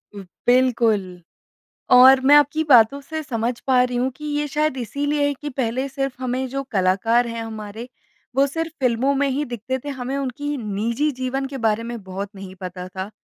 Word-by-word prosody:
बिल्कुल। 215 -2 +1 0.7
और 260 +1 +8
मैं 285 +2 +7
आपकी 295 +2 +3
बातों 255 -1 +5
से 315 +3 -5
समझ 235 -3 -2
पा 255 -2 +4
रही 250 -1 -1
हूँ 250 +2 0
कि 300 - -10
ये 295 0 -1
शायद 300 -1 0
इसीलिए 285 +5 -1
है 285 - +1
कि 295 +2 -7
पहले 255 0 -2
सिर्फ़ 270 -1 -3
हमें 255 +1 -1
जो 275 +2 -3
कलाकार 205 +5 +2
हैं 230 0 -4
हमारे 220 +1 -7 0.5
वो 275 +1 +5
सिर्फ़ 325 +3 -4
फिल्मों 255 +2 +2
में 280 0 +1
ही 275 +2 -1
दिखते 245 +1 -4
थे। 290 - -9
हमें 265 -1 -4
उनकी 280 +2 -3
निजी 230 +5 -1
जीवन 265 +1 -2
के 270 0 -7
बारे 220 +1 +1
में 235 -1 -6
बहुत 190 +1 -5
नहीं 190 -1 -9
पता 180 -1 -6
था। 190 +2 -6
255 Hz, 185 wpm, -22 LUFS, 225-275 Hz, 0.7 s, और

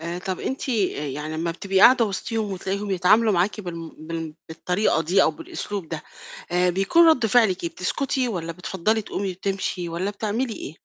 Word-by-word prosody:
آآ، 170 +2 -4
طب 185 0 -4
أنتِ 265 +1 -4
آآ، 195 - 0
يعني 150 +3 -4
لمّا 170 +1 -1
بتبقي 190 +2 0
قاعدة 245 +1 +7
وسطيهم 215 +1 -3
وتلاقيهم 195 +2 -3
يتعاملوا 210 +5 +4
معاكِ 190 +4 +1
بالم 170 -4 -6
بال 160 0 -6
بالطريقة 180 +1 0
دي 185 +5 +3
أو - - +3
بالأسلوب 260 - -6
ده، 160 -2 -5 0.5
آآ، 180 0 +3
بيكون 195 - +4
رد 255 -8 +4
فعلِك 215 -7 +3
إيه؟ 170 - -1
بتسكُتي؟ 255 +6 -1
والَّا 165 -5 -3
بتفضَّلي 190 +5 -1
تقومي 195 -1 -3
وتمشي؟ 190 -1 -3
والَّا 175 +4 -2
بتعملي 220 +4 -2
إيه؟ - - -7
190 Hz, 175 wpm, -24 LUFS, 170-215 Hz, 0.5 s, قاعدة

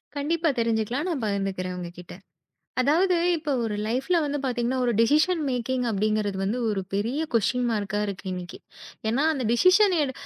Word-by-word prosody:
கண்டிப்பா 320 +3 0
தெரிஞ்சுக்கலாம், 230 +5 0
நான் 295 -8 -2
பகிர்ந்துக்குறேன் 195 -3 -2
உங்ககிட்ட. 175 0 -8 0.7
அதாவது 340 +8 +3 0.2
இப்ப 310 -2 -4
ஒரு 215 -2 -2
லைஃப்ல 260 +10 0
வந்து 290 0 -2
பாத்தீங்கன்னா, 250 0 -1
ஒரு 240 - +2
டெசிஷன் 310 +8 +3
மேக்கிங் 250 0 -1
அப்படிங்கறது 210 -1 0
வந்து 210 +6 -1
ஒரு 205 -2 0
பெரிய 230 +9 -1
கொஸ்டின் 245 +3 +1
மார்கா 205 -1 -1
இருக்கு 200 -1 -6
இன்னைக்கு. 180 -1 -6 0.5
ஏன்னா 240 +6 +1
அந்த 270 -4 -3
டெசிஷன் 370 - +5
எடு 265 -2 -1
240 Hz, 150 wpm, -25 LUFS, 205-290 Hz, 0.7 s, டெசிஷன்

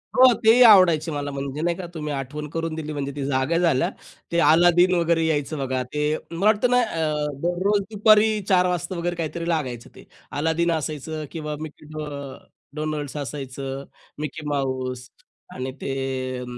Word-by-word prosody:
हो. 255 -1 +7
तेही 230 +3 +7
आवडायचे 170 -6 +6
मला 145 -1 -3
म्हणजे 140 +1 -4
नाही 170 +1 0
का, 185 - -6
तुम्ही 150 -2 -4
आठवण 145 +2 -5
करून 165 +1 -3
दिली 155 -1 -5
म्हणजे 140 -1 -3
ती 140 -2 -3
जागा 135 +4 +1
झाल्या 165 -7 +2 0.4
ते 170 - +2
अलादीन 175 +3 +5
वगैरे 170 -1 +2
यायचं 155 -1 -1
बघा 130 -2 -1
ते 150 +1 +1 0.2
मला 170 +4 -2
वाटतं 215 +3 +4
ना, 250 - +5
अ, 155 -8 -1
दररोज 185 +4 +1
दुपारी 215 +1 +4
4:00 180 -1 +4
वाजता 180 0 -2
वगैरे 175 +1 -2
काहीतरी 170 0 -4
लागायचं 130 -8 -2
ते. - - -14 0.3
अलादीन 160 +2 +1
असायचं 155 0 -3
किंवा 150 -2 -4
मिक्की 155 -1 -9
अ, 155 0 -6 0.7
डो 150 - -4
डोनल्ड्स 155 -2 -3
असायचं, 135 -1 -5 0.4
मिक्की 150 +1 -5
माऊस 130 -3 -3 0.5
आणि 130 +1 -4
ते 130 -1 -3
155 Hz, 165 wpm, -23 LUFS, 140-170 Hz, 0.7 s, हो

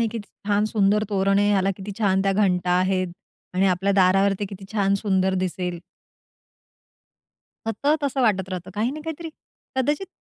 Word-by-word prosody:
आहे. 230 - +2
किती 220 -2 -7 0.2
छान 205 0 +2
सुंदर 210 0 +3
तोरण 195 0 +2
आहे 205 0 +3
याला 195 -1 +2
किती 200 +1 -7
छान 190 -3 +2
त्या 195 0 +2
घंटा 180 -3 +1
आहेत 185 0 +1 0.4
आणि 190 +1 +3
आपल्या 190 +2 +1
दारावर 195 +1 +4
ते - - 0
किती 195 -1 -9
छान 200 -2 +2
सुंदर 190 -2 +1
दिसेल. 180 -1 -3 1.9
सतत, 280 +8 +1
तसं 275 -1 0
वाटत 190 -5 +2
राहतं, 185 0 -6
काही 220 +4 0
ना 310 - -7
काहीतरी, 320 +1 -5 0.5
कदाचित 295 +8 0
195 Hz, 165 wpm, -23 LUFS, 190-215 Hz, 1.9 s, दारावर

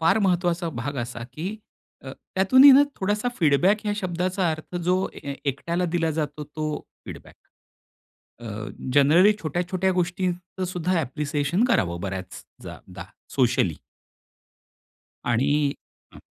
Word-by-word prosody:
फार 190 +6 +3
महत्वाचा 175 -3 +1
भाग 140 +2 -4
असा, 120 -1 -7
की 180 +10 -5 0.5
अ, 135 - -6 0.2
त्यातूनही 260 +9 +7
ना 275 +2 +8 0.2
थोडासा 210 +5 0
फीडबॅक 180 +7 +3
या 205 - +1
शब्दाचा 185 -1 -1
अर्थ 155 +3 -6
जो 180 +1 +1 0.3
ए 140 - -4
एकट्याला 170 +6 -1
दिला 165 -2 +1
जातो 150 -1 -3
तो 155 +1 -5 0.4
फीडबॅक. - - -10 1.1
अ, - - -11 0.5
जनरली 160 +9 +6
छोट्या 165 +3 -1
छोट्या 190 0 +1
गोष्टींचं 180 +1 -2
सुद्धा 180 0 -1
ॲप्रिसिएशन 150 - -1
करावं 85 - +1
बऱ्याच 95 -1 -6 0.2
जा - - -8 0.2
दा - - -7 0.3
सोशली. 125 - +2 1.5
आणि 120 +2 +1 0.7
हं. - - -12
170 Hz, 125 wpm, -24 LUFS, 145-185 Hz, 1.5 s, ना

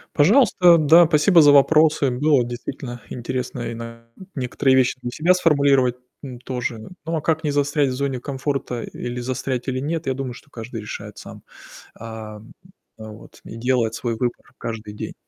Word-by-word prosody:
Пожалуйста, 180 - +5
да, 165 +3 +6
спасибо 160 +2 +4
за 145 -1 +7
вопросы. 150 -1 +4
Было 140 0 +2
действительно 120 0 -7
интересно 125 +1 -4
и - - -5
на 115 0 -9 0.3
некоторые 130 +1 +1
вещи 130 0 +2
для 120 - -4
себя 170 +7 +3
сформулировать, 140 -7 +3 0.3
м, 130 -4 -8
тоже. 125 -3 -4 0.3
Ну 165 0 -2
а 155 - -2
как 160 +1 0
не 145 - +1
застрять 145 0 +1
в - - -3
зоне 135 -1 -2
комфорта, 135 -3 -3
или 120 0 -6
застрять 130 0 -3
или 130 0 -2
нет, 155 +1 -3
я 130 - +1
думаю, 130 -2 -5
что 145 - -15
каждый 115 -2 -8
решает 105 - -8
сам. - - -11 0.5
Ам, 110 -1 -10 0.5
э, - - -10
вот. 110 0 -13
И 115 - -10
делает 115 -2 0
свой 115 0 -3
выбор 120 +1 -4
каждый 110 -2 -6
день. - - -7
130 Hz, 175 wpm, -21 LUFS, 120-145 Hz, 0.5 s, за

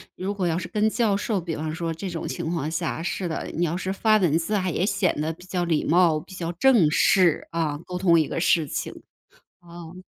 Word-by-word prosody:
如 195 +2 -3
果 185 -3 -1
要 165 0 0
是 180 -1 -5
跟 215 +2 +1
教 215 -4 +1
授， 205 -2 -1
比 165 -2 -4
方 155 +1 -4
说 165 -1 -3
这 185 +4 -6
种 170 -1 -5
情 165 -2 -4
况 160 -2 -2
下 165 0 -3
是 180 0 -2
的， 160 - -4
你 175 - 0
要 165 +2 -2
是 185 +1 -3
发 215 +2 +2
文 165 -5 +2
字 190 +6 -3
啊， 185 -2 0
也 180 - 0
显 195 -3 +1
得 160 +2 -1
比 175 +3 -16
较 180 -1 -2
礼 165 -3 +1
貌， 165 -2 +3
比 190 - -14
较 170 -1 -4
正 205 - +4
式， 180 0 +3
啊， 160 -3 -1
沟 180 0 -5
通 175 -2 +4
一 155 - +2
个 - - -2
事 165 -1 +3
情。 140 - -4 0.7
嗯。 170 +1 -11
175 Hz, 255 characters per minute, -24 LUFS, 165-190 Hz, 0.7 s, 正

